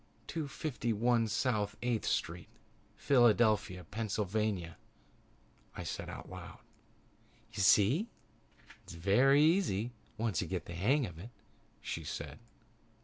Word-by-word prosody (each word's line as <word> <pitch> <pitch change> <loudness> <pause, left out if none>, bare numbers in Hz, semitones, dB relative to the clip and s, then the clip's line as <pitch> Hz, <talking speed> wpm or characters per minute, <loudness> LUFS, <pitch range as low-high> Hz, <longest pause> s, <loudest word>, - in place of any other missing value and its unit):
"Two 160 -3 -4
fifty 140 -5 -3
one 115 +1 +2
South 110 -2 0
Eighth 120 -3 0
Street, 85 0 -1 0.5
Philadelphia, 110 -7 +3
Pennsylvania," 105 -2 -2 1.0
I - - -5
said - - -5
aloud. - - -9 1.0
"You 100 - -2
see, 115 - +4 0.7
it's - - -10
very 125 - +4
easy 155 - +2 0.3
once 110 -6 0
you 90 - -3
get 90 -2 -3
the 85 - -8
hang 125 - +2
of 85 -5 -9
it," 105 +7 -9 0.5
she - - -4
said. - - -6
110 Hz, 115 wpm, -33 LUFS, 95-125 Hz, 1.0 s, see